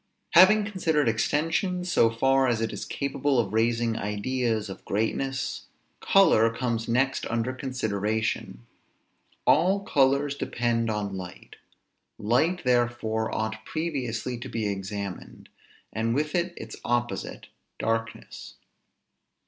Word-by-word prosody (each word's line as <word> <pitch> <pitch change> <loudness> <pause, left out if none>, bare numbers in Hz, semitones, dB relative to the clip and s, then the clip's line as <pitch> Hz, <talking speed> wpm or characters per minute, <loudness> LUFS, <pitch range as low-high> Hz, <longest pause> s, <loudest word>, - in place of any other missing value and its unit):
Having 205 +4 +7
considered 160 - 0
extension, 165 - 0
so 140 -10 +3
far 135 +3 +2
as 120 -2 +1
it 115 -1 -2
is - - -5
capable 140 0 -1
of 110 -4 0
raising 115 0 +1
ideas 110 +2 -1
of 95 - -9
greatness; 130 +6 -2 0.3
color 160 - +5
comes 115 -1 -2
next 130 +3 +1
under 115 +2 -1
consideration. 110 - -2 0.8
All 185 +7 +4
colors 140 -4 +2
depend 120 -4 -1
on 105 -2 -2
light. 90 -2 -9 0.6
Light 150 - +1
therefore 120 -3 0
ought 110 0 -3
previously 130 -7 -3
to - - -7
be 110 -1 -2
examined; 100 -1 -6 0.4
and 115 +1 0
with 150 +1 -1
it 175 0 -1
its - - -8
opposite, 120 0 -2 0.3
darkness. 115 0 -4
120 Hz, 115 wpm, -26 LUFS, 110-140 Hz, 0.8 s, Having